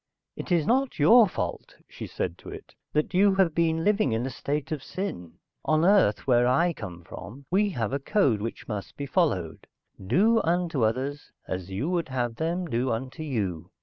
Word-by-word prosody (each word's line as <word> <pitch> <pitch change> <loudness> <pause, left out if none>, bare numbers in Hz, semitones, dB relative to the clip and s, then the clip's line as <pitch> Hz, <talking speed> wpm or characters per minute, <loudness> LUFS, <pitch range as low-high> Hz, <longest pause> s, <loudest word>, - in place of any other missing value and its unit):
"It - - -7
is 170 -4 +3
not 260 - +1
your 215 +10 +7
fault," - - -5
she - - -8
said 85 -2 -3
to - - -11
it, - - -10 0.2
"That 150 +4 0
you 195 +1 +4
have 190 -4 +3
been 165 0 +1
living 205 - +2
in 115 +2 -1
a 135 - -3
state 145 +4 -3
of 155 -3 -2
sin. 140 - -5 0.3
On 155 +1 +2
Earth, 190 - +3
where 120 -2 +4
I 170 +7 +3
come 90 - -8
from, 125 - -10
we 205 +3 +3
have 115 +1 -1
a 140 - 0
code 135 - +1
which 115 +2 -6
must 105 -3 -6
be 145 - -4
followed. 130 - -1 0.4
Do 210 - +3
unto 165 -6 0
others 130 +6 -2 0.2
as 95 0 -4
you 100 +10 -3
would 170 -5 -1
have 120 -3 -2
them 170 +3 -1
do 130 -3 -1
unto 130 +7 -4
you. 105 - -3
145 Hz, 190 wpm, -26 LUFS, 115-175 Hz, 0.4 s, your